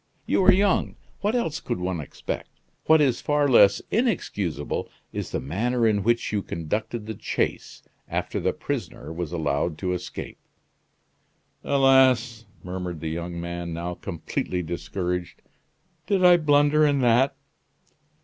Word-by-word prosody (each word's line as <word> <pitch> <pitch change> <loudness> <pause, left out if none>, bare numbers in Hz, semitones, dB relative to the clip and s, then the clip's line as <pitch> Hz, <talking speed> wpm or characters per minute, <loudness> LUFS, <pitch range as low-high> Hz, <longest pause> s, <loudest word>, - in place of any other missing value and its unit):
You - - +2
are - - +9
young 195 0 +2 0.2
what 210 +4 0
else 165 -11 -1
could - - -3
one 90 -1 -2
expect? 75 - -6 0.4
What 160 -1 +6
is 135 -5 +2
far 145 -1 +2
less 105 -6 +5
inexcusable 100 - -1 0.2
is - - -4
the - - -2
manner 115 - 0
in 105 -2 +2
which 120 +3 +1
you 105 - +1
conducted 105 +7 -4
the 110 - -4
chase, - - -3 0.2
after - - -2
the - - +1
prisoner 75 +3 -5
was 85 -1 -4
allowed 80 -1 -1
to 90 +1 -2
escape." 90 0 -6 1.2
"Alas!" 130 -4 +3 0.2
murmured 90 -2 -5
the 80 0 -4
young 85 +1 -4
man, 85 0 -5
now 85 +1 -4
completely 90 0 -4
discouraged; 90 +1 -4 0.6
"did 195 -3 +2
I 175 -1 +8
blunder 145 -1 +4
in 145 -2 +3
that?" 125 +3 +3
105 Hz, 140 wpm, -25 LUFS, 85-140 Hz, 1.2 s, are